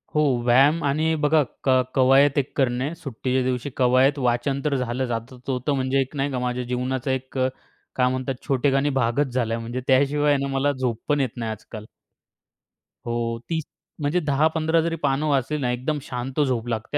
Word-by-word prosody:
हो. 150 Hz, -, +4 dB, 0.2 s
व्यायाम 140 Hz, +7 st, +4 dB
आणि 155 Hz, +3 st, +1 dB
बघा 155 Hz, +1 st, +4 dB, 0.2 s
क -, -, 0 dB, 0.3 s
कवायत 135 Hz, +2 st, +5 dB
एक 140 Hz, -1 st, 0 dB
करणे. 130 Hz, +3 st, 0 dB
सुट्टीच्या 130 Hz, -4 st, -2 dB
दिवशी 125 Hz, +1 st, -2 dB
कवायत, 130 Hz, +3 st, +3 dB
वाचन 125 Hz, +2 st, 0 dB
तर 145 Hz, -2 st, +1 dB
झालं 125 Hz, 0 st, -1 dB
जातच 120 Hz, +2 st, -6 dB
होतं. 130 Hz, +2 st, -1 dB
म्हणजे 130 Hz, 0 st, 0 dB
एक 135 Hz, +3 st, -5 dB
नाही 140 Hz, 0 st, -1 dB
का? 125 Hz, -, -2 dB
माझ्या 125 Hz, 0 st, -2 dB
जीवनाचा 125 Hz, +2 st, -2 dB
एक 130 Hz, 0 st, -2 dB
क 130 Hz, -, +2 dB, 0.5 s
काय 125 Hz, -1 st, +3 dB
म्हणतात 130 Hz, +1 st, -2 dB
छोटेखानी 135 Hz, +1 st, +2 dB
भागच 125 Hz, +3 st, 0 dB
झालाय. 115 Hz, -3 st, 0 dB
म्हणजे 120 Hz, +2 st, -5 dB
त्याशिवाय 145 Hz, +2 st, +3 dB
ना 140 Hz, -, -2 dB
मला 135 Hz, +2 st, +2 dB
झोप 125 Hz, -4 st, -2 dB
पण 145 Hz, -1 st, +2 dB
येत 130 Hz, -, 0 dB
नाही 115 Hz, -2 st, -3 dB
आजकाल. 110 Hz, 0 st, -9 dB, 1.2 s
हो. 115 Hz, -1 st, -2 dB
30. 160 Hz, -1 st, -1 dB, 0.4 s
म्हणजे 145 Hz, +5 st, +1 dB
10-15 160 Hz, +2 st, +1 dB
जरी 165 Hz, 0 st, -1 dB
पानं 140 Hz, +1 st, +1 dB
वाचली 140 Hz, +1 st, +1 dB
ना, 125 Hz, -4 st, -1 dB
एकदम 130 Hz, +5 st, -2 dB
शांत 130 Hz, +2 st, -5 dB
झोप 125 Hz, -5 st, 0 dB
लागते 115 Hz, +4 st, -2 dB
130 Hz, 175 wpm, -23 LUFS, 125-145 Hz, 1.2 s, कवायत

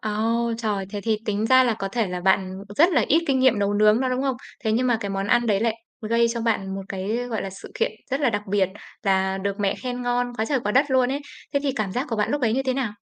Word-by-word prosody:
Ô, 230 Hz, +2 st, 0 dB
trời! 210 Hz, -4 st, -2 dB
Thế 205 Hz, -, -4 dB
thì 215 Hz, 0 st, 0 dB
tính 210 Hz, +1 st, -1 dB
ra 260 Hz, +1 st, +6 dB
là 235 Hz, -3 st, +2 dB
có 195 Hz, -2 st, -4 dB
thể 225 Hz, +1 st, 0 dB
là 180 Hz, 0 st, -4 dB
bạn 190 Hz, +1 st, +1 dB
rất 340 Hz, +5 st, +5 dB
là -, -, +3 dB
ít 325 Hz, +3 st, +4 dB
kinh 270 Hz, -2 st, +2 dB
nghiệm 260 Hz, -4 st, +4 dB
nấu 205 Hz, 0 st, +1 dB
nướng 215 Hz, +2 st, +4 dB
đó, 260 Hz, -, +1 dB
đúng 255 Hz, +1 st, -1 dB
không? 270 Hz, -2 st, 0 dB, 0.3 s
Thế 220 Hz, -, +2 dB
nhưng 245 Hz, +3 st, +2 dB
mà 240 Hz, -2 st, +3 dB
cái 200 Hz, -, -3 dB
món 195 Hz, 0 st, -2 dB
ăn 240 Hz, +3 st, +3 dB
đấy 200 Hz, -2 st, +2 dB
lại 225 Hz, -1 st, +1 dB, 0.3 s
gây 235 Hz, +1 st, +3 dB
cho 235 Hz, 0 st, -2 dB
bạn 195 Hz, -4 st, -1 dB
một 195 Hz, -, -5 dB
cái, 195 Hz, +3 st, -2 dB
gọi 220 Hz, -, -2 dB
là, 195 Hz, -, -5 dB
sự 195 Hz, +1 st, -11 dB
kiện -, -, 0 dB, 0.2 s
rất 270 Hz, +3 st, 0 dB
là 270 Hz, -4 st, +3 dB
đặc 205 Hz, -2 st, -2 dB
biệt, 195 Hz, -1 st, +2 dB, 0.3 s
là 190 Hz, -1 st, +1 dB
được 200 Hz, +1 st, -3 dB
mẹ 200 Hz, -1 st, +1 dB
khen 250 Hz, -1 st, -5 dB
ngon 245 Hz, 0 st, 0 dB
quá 220 Hz, -, +1 dB
trời 270 Hz, +2 st, 0 dB
quá 210 Hz, -2 st, -2 dB
đất 275 Hz, +3 st, +3 dB
luôn 255 Hz, -1 st, +3 dB
ấy. 285 Hz, -, -2 dB, 0.3 s
Thế 280 Hz, -, +3 dB
thì 275 Hz, -, 0 dB
cảm 215 Hz, -7 st, -2 dB
giác 255 Hz, +7 st, -2 dB
của 225 Hz, -, -1 dB
bạn 210 Hz, -, 0 dB
lúc 290 Hz, 0 st, 0 dB
ấy 225 Hz, -3 st, +2 dB
như 270 Hz, +2 st, +1 dB
thế 260 Hz, -1 st, 0 dB
nào? 255 Hz, -6 st, -1 dB
225 Hz, 295 wpm, -24 LUFS, 200-255 Hz, 0.3 s, ra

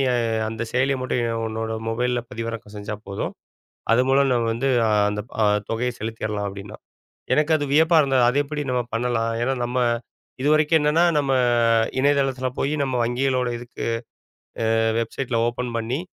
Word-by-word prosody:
நீ -, -, +2 dB, 0.4 s
அந்தச் 110 Hz, +1 st, -5 dB
செயலிய 135 Hz, +2 st, +2 dB
மட்டும் 120 Hz, -3 st, -1 dB
உன்னோட 110 Hz, 0 st, -3 dB, 0.2 s
மொபைல்ல 125 Hz, +2 st, 0 dB
பதிவிறக்கம் 115 Hz, -3 st, -6 dB
செஞ்சா 105 Hz, +1 st, -5 dB
போதும். 100 Hz, 0 st, -4 dB, 0.6 s
அது 115 Hz, -, +5 dB
மூலம் 135 Hz, 0 st, +4 dB
நாம 120 Hz, -2 st, +1 dB
வந்து 125 Hz, +4 st, -1 dB, 0.4 s
அந்தத் 105 Hz, +2 st, -4 dB, 0.4 s
தொகைய 120 Hz, +2 st, 0 dB
செலுத்திறலாம் 110 Hz, -2 st, -3 dB
அப்படின்னான். 100 Hz, +2 st, -9 dB, 0.5 s
எனக்கு 150 Hz, +1 st, +2 dB
அது 145 Hz, -, -2 dB
வியப்பா 160 Hz, +3 st, +5 dB
இருந்தது. 135 Hz, -3 st, +2 dB
அத 125 Hz, -, 0 dB
எப்படி 150 Hz, +1 st, -4 dB
நம்ம 125 Hz, -1 st, +1 dB
பண்ணலாம்? 115 Hz, -1 st, 0 dB
ஏன்னா 130 Hz, +2 st, +1 dB
நம்ம 125 Hz, +1 st, -2 dB, 0.6 s
இதுவரைக்கும் 155 Hz, +2 st, +4 dB
என்னன்னா 150 Hz, +3 st, +3 dB
நம்ம 140 Hz, -2 st, +1 dB, 0.7 s
இணையதளத்துல 135 Hz, -2 st, +1 dB
போய் 140 Hz, -, 0 dB
நம்ம 135 Hz, -2 st, -1 dB
வங்கிகளோட 125 Hz, +1 st, 0 dB
இதுக்கு 120 Hz, +1 st, -7 dB, 0.9 s
அ -, -, +3 dB, 0.2 s
வெப்சைட்ல 115 Hz, +1 st, -2 dB
ஓபன் 120 Hz, +1 st, -3 dB
பண்ணி, 115 Hz, +4 st, -2 dB
125 Hz, 145 wpm, -23 LUFS, 115-135 Hz, 0.9 s, அது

